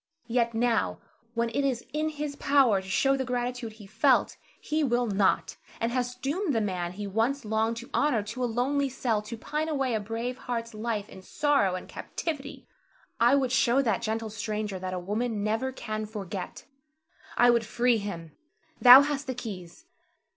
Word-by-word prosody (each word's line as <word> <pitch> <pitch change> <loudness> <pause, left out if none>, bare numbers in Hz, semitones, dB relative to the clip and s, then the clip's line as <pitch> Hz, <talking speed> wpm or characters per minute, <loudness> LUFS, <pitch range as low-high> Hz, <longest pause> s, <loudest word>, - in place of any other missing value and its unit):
Yet 235 -1 0
now, 230 -1 +1 0.4
when 235 0 +1
it 275 +5 -1
is 255 -4 -1
in 305 +1 0
his 300 -1 -4
power 270 -9 +3
to 190 - -12
show 270 +7 +3
the 265 - -1
gratitude 245 -2 -3
he 215 -2 -13
felt, 195 - +2 0.2
he 310 +1 -1
will 245 -2 +2
not, 200 -3 +1 0.2
and 230 +1 0
has 245 0 -1
doomed 285 +5 -1
the - - +3
man 180 -4 -2
he 205 +2 -5
once 225 +7 0
longed 220 +2 0
to 240 - -8
honor 250 -8 +2
to 230 +5 -5
a 245 - +1
lonely 270 +4 0
cell 240 -4 -1
to 215 +2 -7
pine 305 +7 -3
away 270 -5 0
a 220 - +1
brave 230 +4 -4
heart's 230 -2 -4
life 215 -1 -3
in 190 - -12
sorrow 275 -4 +1
and 185 - -7
captivity. 290 -4 -5 0.5
I 240 +4 +5
would 265 -3 +1
show 265 0 +3
that 225 -4 0
gentle 220 -1 -2
stranger 210 -2 -3
that 185 0 -4
a - - -2
woman 210 +4 -2
never 225 +5 0
can 215 -4 -5
forget. 195 -3 -6 0.7
I 245 0 +6
would 235 -1 +2
free 240 +1 +2
him. 170 -6 -6 0.5
Thou 250 +2 +11
hast 285 -1 -3
the 260 - -3
keys. 210 - -8
235 Hz, 185 wpm, -28 LUFS, 215-265 Hz, 0.7 s, Thou